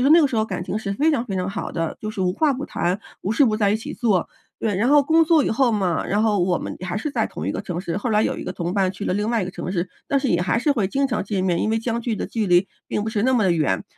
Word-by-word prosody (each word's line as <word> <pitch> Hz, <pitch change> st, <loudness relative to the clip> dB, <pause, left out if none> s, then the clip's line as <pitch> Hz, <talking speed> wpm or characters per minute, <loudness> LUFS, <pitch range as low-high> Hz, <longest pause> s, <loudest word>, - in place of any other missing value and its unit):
说 275 Hz, -, +4 dB
那 335 Hz, +1 st, +8 dB
个 295 Hz, -, +4 dB
时 255 Hz, -4 st, -3 dB
候 220 Hz, -, +2 dB
感 185 Hz, -4 st, -4 dB
情 210 Hz, -, -2 dB
是 200 Hz, -2 st, -3 dB
非 305 Hz, +9 st, +3 dB
常 250 Hz, -5 st, 0 dB
非 195 Hz, -, -4 dB
常 185 Hz, +1 st, -1 dB
好 -, -, -4 dB
的， 165 Hz, -1 st, -3 dB
就 215 Hz, -, -4 dB
是 200 Hz, -, -6 dB
无 180 Hz, 0 st, +1 dB
话 290 Hz, +4 st, +2 dB
不 275 Hz, +3 st, -4 dB
谈， 180 Hz, +3 st, -1 dB, 0.2 s
无 200 Hz, -, -3 dB
事 280 Hz, +6 st, +4 dB
不 215 Hz, -4 st, +2 dB
在 200 Hz, -2 st, +3 dB
一 215 Hz, -, +2 dB
起 225 Hz, -, -7 dB
做， 215 Hz, -7 st, +1 dB, 0.3 s
对。 215 Hz, -4 st, -1 dB
然 230 Hz, +6 st, +2 dB
后 290 Hz, 0 st, +6 dB
工 325 Hz, +3 st, +4 dB
作 315 Hz, -2 st, +4 dB
以 -, -, 0 dB
后 240 Hz, +2 st, +3 dB
嘛， 185 Hz, -6 st, 0 dB
然 205 Hz, +3 st, +1 dB
后 215 Hz, -3 st, +2 dB
我 175 Hz, -1 st, +1 dB
们 -, -, -6 dB
还 180 Hz, +1 st, -3 dB
是 295 Hz, +8 st, -2 dB
在 -, -, 0 dB
同 -, -, -6 dB
一 -, -, 0 dB
个 -, -, -3 dB
城 175 Hz, -1 st, -4 dB
市， 175 Hz, -1 st, -3 dB
后 240 Hz, -, -3 dB
来 210 Hz, 0 st, +3 dB
有 -, -, 0 dB
一 -, -, -6 dB
个 -, -, -4 dB
同 175 Hz, 0 st, -3 dB
伴 190 Hz, -2 st, +2 dB
去 200 Hz, +1 st, -7 dB
了 -, -, 0 dB
另 210 Hz, +2 st, -1 dB
外 230 Hz, -4 st, +1 dB
一 -, -, -1 dB
个 180 Hz, -, -5 dB
城 180 Hz, -, -5 dB
市， 180 Hz, -1 st, -1 dB, 0.2 s
但 280 Hz, -, +2 dB
是 265 Hz, -, -1 dB
也 175 Hz, 0 st, +2 dB
还 180 Hz, +6 st, +1 dB
是 290 Hz, +4 st, +2 dB
会 220 Hz, -8 st, 0 dB
经 275 Hz, +5 st, +1 dB
常 230 Hz, -5 st, -1 dB
见 195 Hz, -3 st, -1 dB
面， 175 Hz, -2 st, +1 dB
因 215 Hz, -, 0 dB
为 225 Hz, -, +1 dB
相 230 Hz, 0 st, -2 dB
距 235 Hz, -1 st, -2 dB
的 -, -, -3 dB
距 220 Hz, -3 st, -2 dB
离 180 Hz, +2 st, +4 dB, 0.2 s
并 210 Hz, -, -1 dB
不 220 Hz, -, -3 dB
是 210 Hz, -2 st, -1 dB
那 260 Hz, +2 st, +3 dB
么 225 Hz, -, +3 dB
地 180 Hz, -, +3 dB
远， 135 Hz, -12 st, 0 dB
215 Hz, 370 characters per minute, -22 LUFS, 185-245 Hz, 0.3 s, 那